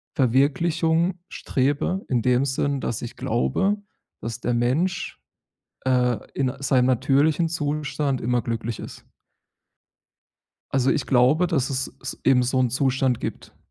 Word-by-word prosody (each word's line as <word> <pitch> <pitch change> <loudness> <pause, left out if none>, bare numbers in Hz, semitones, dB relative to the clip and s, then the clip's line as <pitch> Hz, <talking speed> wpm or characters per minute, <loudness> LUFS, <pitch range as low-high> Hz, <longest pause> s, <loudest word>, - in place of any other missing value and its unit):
Verwirklichung 160 +7 +2
strebe, 145 +6 -1
in 125 -3 +1
dem 125 +3 +2
Sinn, 140 +1 -1
dass 120 -4 -3
ich 120 - -7
glaube, 130 - +1 0.5
dass 115 +1 -5
der 120 - -1
Mensch, 130 +10 0 0.7
äh, 125 -2 +2 0.2
in 130 -2 0
seinem 130 -2 +2
natürlichen 140 +6 +2
Zustand 150 -3 -2
immer 120 +1 0
glücklich 115 -1 -4
ist. - - -10 1.7
Also, 135 0 +2
ich 130 - -1
glaube, 135 +8 +4
dass 140 -6 0
es 130 0 -2
s 135 - -7
eben 130 -2 +4
so 130 +1 0
'n 125 -1 +2
Zustand 130 -1 +1
gibt. - - -6
135 Hz, 130 wpm, -24 LUFS, 125-150 Hz, 1.7 s, glaube